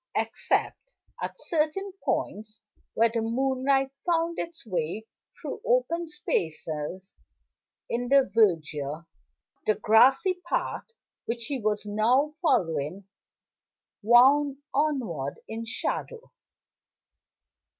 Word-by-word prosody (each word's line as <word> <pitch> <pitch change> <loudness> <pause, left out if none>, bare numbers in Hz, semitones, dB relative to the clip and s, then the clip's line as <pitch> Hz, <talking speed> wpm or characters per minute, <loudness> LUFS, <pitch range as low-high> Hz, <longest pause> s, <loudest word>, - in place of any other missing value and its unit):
Except - - -1 0.3
at - - -5
certain 335 +5 -1
points, 215 +1 -2 0.4
where 230 0 +4
the 230 - 0
moonlight 265 +3 +1
found 335 -1 0
its 335 -4 -6
way 190 +1 -3 0.3
through - - -6
open 345 -9 +1
spaces 170 - -3 0.7
in 245 +1 -2
the 275 -1 +5
verdure, 160 -7 +1 0.6
the 215 - +4
grassy 265 - +4
path - - -2 0.4
which 235 0 -3
he 275 +2 -2
was 210 0 -1
now 240 +8 +2
following 170 - 0 0.9
wound 265 +5 +5 0.2
onward 235 - -1
in 225 +1 -5
shadow. 465 - -4
235 Hz, 95 wpm, -27 LUFS, 205-295 Hz, 0.9 s, the